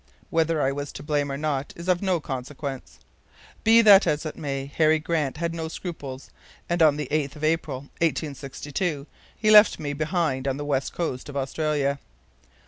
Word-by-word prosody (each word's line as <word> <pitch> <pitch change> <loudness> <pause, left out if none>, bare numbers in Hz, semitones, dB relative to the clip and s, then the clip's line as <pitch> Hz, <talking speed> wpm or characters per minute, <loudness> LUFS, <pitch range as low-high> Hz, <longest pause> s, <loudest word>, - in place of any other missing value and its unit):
Whether 165 -1 +1
I 135 - +2
was 145 0 -5
to - - -8
blame 145 -2 0
or 135 - -3
not 145 -2 -2
is 170 +1 -9
of 180 -1 +2
no 190 -3 +1
consequence. 130 - -6 0.7
Be 230 +1 +6
that 205 -2 +8
as 150 +2 0
it 155 - -4
may, 135 -3 -4
Harry 155 +3 +3
Grant 155 -3 -1
had 170 +1 -2
no 165 -1 -4
scruples, 145 -6 -7 0.4
and 175 0 0
on 150 -2 +5
the 150 -3 -3
8th 150 -2 -1
of 150 - -10
April, 155 -4 0 0.2
1862, 145 0 -2 0.3
he 215 -1 +2
left 210 0 +8
me 145 -2 -3
behind 155 -3 -1
on 135 0 0
the 145 - -5
west 140 -2 -1
coast 150 -6 -3
of 140 - -5
Australia." 140 0 -1
150 Hz, 180 wpm, -25 LUFS, 140-165 Hz, 0.7 s, that